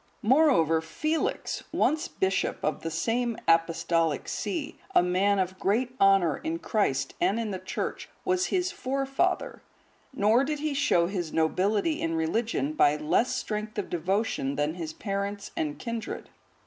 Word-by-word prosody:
Moreover 215 - +4
Felix, 310 - -2
once 310 0 +1
bishop 190 0 0
of 155 - -1
the 165 - -3
same 230 +8 -1
Apostolic 165 -1 +2
see, 310 -4 -3 0.2
a - - +6
man 190 +3 +2
of 185 0 -1
great 245 +6 0
honour 195 -6 +5
in 165 +1 -3
Christ 160 -7 0
and 195 +6 +2
in 225 -2 -2
the 190 - -4
Church, 185 - -4 0.2
was 370 0 +1
his 360 -1 0
forefather.(146) 275 - -3
Nor 220 +6 +4
did 300 +2 -1
he 300 0 -2
show 270 -11 +3
his 175 -3 -3
nobility 200 - +1
in 165 0 -1
religion 225 - 0
by 150 - +4
less 150 +11 +1
strength 215 0 -4
of 205 - -3
devotion 175 -5 -1
than 145 +2 0
his 165 -3 -5
parents 200 +2 -4
and 150 -2 -2
kindred. 230 -2 -5
200 Hz, 150 wpm, -28 LUFS, 165-255 Hz, 0.2 s, a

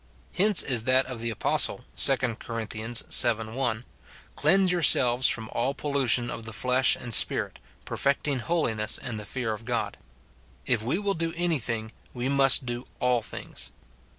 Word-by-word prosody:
Hence 205 0 +4
is 120 -5 0
that 130 +1 +3
of 125 -2 -8
the 115 - -3
apos 110 - +4
tle, - - -10
2 135 - +3 0.2
Cor. 115 -1 -6
vii. 115 0 +1
1, 120 -2 -3 0.2
" - - -23
Cleanse 195 -1 +2
yourselves 130 -7 +4
from 110 -1 +2
all 130 +4 -2
pollution 135 -4 +1
of 115 - -8
the 115 - -7
flesh 125 +3 +2
and 120 -2 -7
spirit, - - +2 0.3
perfecting 140 0 -1
holiness 120 -8 0
in 120 -3 -6
the 105 -1 -7
fear 125 -4 -3
of 110 +1 -9
God." 120 0 -4 0.7
If 120 -4 0
we 120 +10 -2
will 200 0 -1
do 165 -2 -4
any 170 -3 -1
thing, 110 -2 -5 0.2
we 125 +2 -3
must 135 -1 +5
do 120 0 -5
all 125 -2 +1
things. - - -8
125 Hz, 170 wpm, -25 LUFS, 115-140 Hz, 0.7 s, must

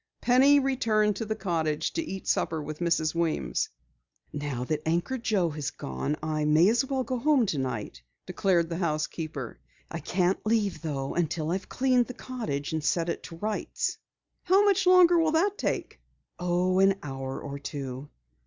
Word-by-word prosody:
Penny 270 +4 +5
returned 220 -6 +1
to 225 - -3
the 220 0 -2
cottage 165 -7 -1
to 330 - -1
eat 195 - -6
supper 160 - +1
with 150 0 -6
Mrs. 165 -2 +1
Weems. 160 - -1 0.6
"Now 145 -4 -3
that 155 +3 -2
Anchor 175 +11 -1
Joe 200 -7 +1
has 145 -2 -3
gone, 65 - -3
I 155 -1 -1
may 155 +5 +5
as 235 +3 +3
well 270 -1 -1
go 255 +1 -3
home 280 -2 +3
tonight," 130 - -3 0.2
declared 175 -4 +1
the 165 - -3
housekeeper. 155 -5 -3 0.3
"I 170 - -4
can't 180 +4 0
leave, 215 -3 0
though, 140 -4 -3
until 165 -1 -1
I've 185 +1 -3
cleaned 255 -2 +2
the 250 - -8
cottage 160 - -4
and 160 -1 -2
set 165 +2 +1
it - - -3
to 170 - -9
rights." 210 +5 -3 0.4
"How 385 +3 +4
much 390 -2 +3
longer 355 -2 +7
will 320 -1 +2
it 395 +5 +2
take?" - - -2 0.4
"Oh, 180 +1 +1
an 195 0 +5
hour 135 -1 -5
or 140 -1 -6
two." 140 -1 -6
175 Hz, 170 wpm, -27 LUFS, 150-230 Hz, 0.6 s, longer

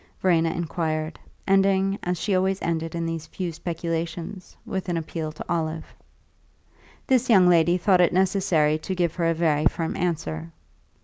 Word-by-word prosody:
Verena 165 -3 +3
inquired, 160 -1 -3 0.3
ending, 195 0 +3
as 180 0 -2
she 205 - -1
always 190 +1 +1
ended 165 0 -2
in 170 0 -2
these 165 -1 -4
few 180 -3 -4
speculations, 170 +2 -5
with 190 -2 -4
an 175 - 0
appeal 160 -1 -4
to 155 - -9
Olive. 160 -1 -3 1.1
This 255 -3 +2
young 190 -5 +6
lady 175 0 +4
thought 185 0 +3
it 175 - +4
necessary 180 -5 +2
to 190 +4 -4
give 175 -3 0
her 170 -2 0
a 165 - +1
very 155 -2 +2
firm 165 -1 -2
answer. 85 - -3
170 Hz, 160 wpm, -24 LUFS, 160-185 Hz, 1.1 s, young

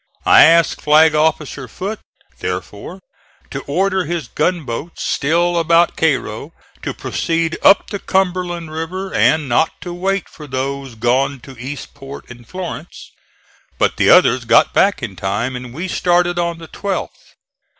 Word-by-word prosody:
I - - +8
asked 165 +1 +3
Flag 155 +1 +5
officer 150 -3 0
Foote, 205 - -5 0.4
therefore, 100 - -6 0.5
to 135 - -4
order 190 +5 +1
his 165 -4 -3
gunboats 160 -3 -2
still 170 +4 +1
about 170 +1 +3
Cairo 140 -2 -1 0.3
to - - -4
proceed 165 0 -1
up 200 - +5
the 200 - -3
Cumberland 180 -4 -1
River 180 +5 -5
and 155 -2 +3
not 130 +6 +1
to 175 - -6
wait 190 +1 -1
for 150 - -12
those 135 -1 -4
gone 130 +4 0
to 135 - -12
Eastport 135 +1 -9
and 120 -1 -13
Florence; 180 -2 -8 0.7
but - - +1
the - - +3
others - - +5
got - - +4
back - - +2
in - - -5
time 105 +7 -2
and 125 -1 -7
we 165 +9 -5
started 175 -1 +1
on 170 -1 -1
the 165 -1 -11
12th. 200 +2 -5
160 Hz, 145 wpm, -18 LUFS, 135-175 Hz, 0.7 s, I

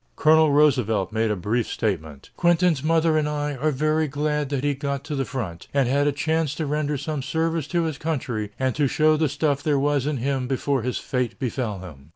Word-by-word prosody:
Colonel 155 -1 +5
Roosevelt 125 -10 +2
made 110 0 0
a 105 - +1
brief 105 +5 -1
statement: 80 - -3
"Quentin's 175 -4 +3
mother 160 0 +3
and 150 -1 -1
I 145 0 -2
are 155 +5 +1
very 155 +2 +1
glad 150 0 -1
that 140 -2 -2
he 145 0 +2
got 140 0 -3
to 150 -1 -4
the 135 -1 -1
front, 105 -9 -5
and 135 -3 +3
had 140 +3 +2
a - - +3
chance 155 +1 -1
to 160 - -2
render 150 0 -1
some 145 +1 -3
service 160 +2 -1
to 170 +1 0
his 155 -3 -3
country 125 -9 -2
and 130 -1 0
to 145 -2 +2
show 155 +3 +3
the 155 -1 +1
stuff 145 0 0
there 150 -2 +1
was 145 0 +1
in 150 -2 -1
him 130 +1 -1
before 135 0 0
his 125 +2 -2
fate 125 -3 -2
befell 120 -7 -3
him." 75 -6 -12
145 Hz, 215 wpm, -24 LUFS, 125-155 Hz, -, Colonel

